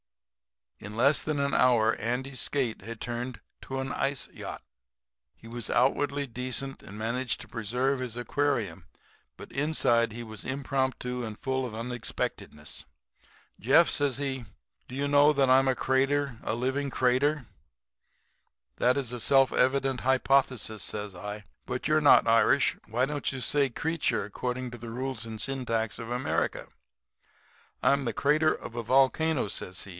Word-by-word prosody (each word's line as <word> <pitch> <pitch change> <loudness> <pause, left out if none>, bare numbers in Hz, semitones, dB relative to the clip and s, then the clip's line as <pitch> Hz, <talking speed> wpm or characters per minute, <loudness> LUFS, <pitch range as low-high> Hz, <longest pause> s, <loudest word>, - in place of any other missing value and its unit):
"In 105 +1 -8
less 140 +5 +4
than 155 -2 -2
an 140 0 0
hour 115 -3 +4
Andy's 125 +4 -3
skate 130 -6 -1
had 115 0 -7
turned 120 +1 -4 0.2
to 135 0 -5
an 135 0 -3
ice 135 0 -1
yacht. - - -8 0.7
He 115 - -15
was 120 -2 -4
outwardly 140 +3 +2
decent 130 +2 -4
and 100 - -10
managed 120 +3 -1
to - - -8
preserve 125 +5 -1
his 125 -2 -4
aquarium, 120 -7 -1 0.5
but - - -11
inside 130 -6 +1
he 120 +2 -6
was 110 -2 -7
impromptu 130 -2 -2
and 110 -2 -6
full 130 -2 -1
of 110 - -8
unexpectedness. 115 -10 -5 0.7
"'Jeff,' 135 - +5
says 140 -3 +1
he, 135 -3 -3 0.4
'do 125 - -8
you 140 +1 -1
know 145 +1 +5
that 135 -2 +3
I'm 135 +1 +5
a 130 - +3
crater 135 -1 +1
a 110 - -2
living 130 +4 -1
crater?' 130 +3 +1 1.3
"'That's 125 0 +1
a 125 - -4
self 135 +3 +4
evident 135 0 +2
hypothesis,' 130 -4 +1
says 105 -2 -3
I. 105 +3 -7 0.2
'But 125 - -2
you're 155 0 +3
not 145 - +7
Irish. 115 +4 +4
Why 120 +4 +1
don't 145 +1 -2
you 135 - -5
say 140 +3 +2
'creature,' 160 -1 -1
according 125 +4 -4
to 120 - -9
the 115 +1 -7
rules 125 -1 -4
and 110 -1 -7
syntax 115 -4 -2
of 115 0 -6
America?' 125 +1 -1 1.1
"'I'm 140 0 +3
the 115 - -1
crater 150 +6 +3
of - - -6
a 120 - -2
volcano,' 135 +4 +2
says 95 -1 -4
he. - - -11
130 Hz, 155 wpm, -28 LUFS, 115-140 Hz, 1.3 s, not